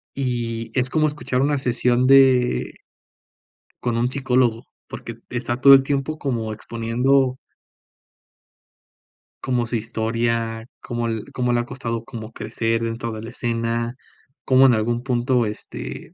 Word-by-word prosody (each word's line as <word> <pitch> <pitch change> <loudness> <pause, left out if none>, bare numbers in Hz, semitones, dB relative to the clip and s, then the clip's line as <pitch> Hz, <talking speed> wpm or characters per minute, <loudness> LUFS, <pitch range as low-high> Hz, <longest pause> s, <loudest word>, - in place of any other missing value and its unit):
y 120 -4 -2
es 130 0 0
como 155 +2 +2
escuchar 145 -4 -2
una 145 +1 +2
sesión 125 -1 +1
de 130 -2 +4 1.1
con 120 -1 0
un 120 +1 +1
psicólogo, 125 -3 +1 0.2
porque 115 - -7
et 115 - -21
está 120 0 -2
todo 140 +1 +9
el 135 - +8
tiempo 140 +2 -2
como 115 -5 -2
exponiendo 125 +4 0 2.0
como 125 -2 0
su 120 - -2
historia, 115 0 -1
como 120 -1 -3
l 110 -2 -3
cómo 125 -2 0
le 120 - +2
ha - - -6
costado 120 -3 -4
como 110 -1 -8
crecer 115 +1 -1
dentro 115 0 -3
de 110 -1 -6
la 115 - -7
escena, 115 0 -2 0.5
cómo 130 0 +6
en 125 - +5
algún 115 +2 0
punto, 125 -1 +1
este, 105 - -7
120 Hz, 140 wpm, -22 LUFS, 115-130 Hz, 2.0 s, todo